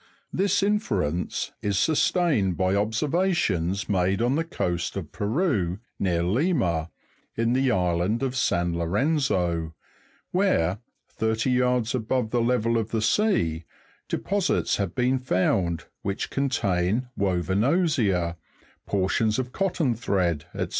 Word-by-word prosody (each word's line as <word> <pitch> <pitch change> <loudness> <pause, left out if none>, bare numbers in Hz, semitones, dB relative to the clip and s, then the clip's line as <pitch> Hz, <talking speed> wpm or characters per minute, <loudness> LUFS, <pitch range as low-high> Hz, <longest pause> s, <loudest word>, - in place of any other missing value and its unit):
This 195 +1 +2
inference 100 - -1
is 100 -2 0
sustained 150 - +2
by 95 -1 +1
observations 110 - 0
made 95 0 +1
on 120 +3 +2
the 160 +3 +1
coast 90 - -2
of 85 -6 -6
Peru, 105 - 0 0.2
near 85 -3 +1
Lima, 95 - +1 0.5
in 115 +1 +1
the 130 +1 +2
island 90 +3 +1
of 130 -1 -1
San 85 -8 +1
Lorenzo, 90 - 0 0.6
where, 105 - +1 0.3
thirty 110 +3 -1
yards 125 -2 +1
above 125 -1 -1
the 120 - +2
level 115 -1 +1
of 110 -1 -3
the 110 - -1
sea, 110 - +1 0.4
deposits 200 -1 0
have 100 -3 -2
been 130 +1 +2
found 90 -6 0 0.2
which 100 0 -3
contain 115 -5 0
woven 95 0 0
osier, 115 - +1 0.5
portions 100 +3 +1
of 130 -1 -3
cotton 175 -8 0
thread, 90 -8 -1
&c. - - 0
110 Hz, 120 wpm, -25 LUFS, 90-130 Hz, 0.6 s, This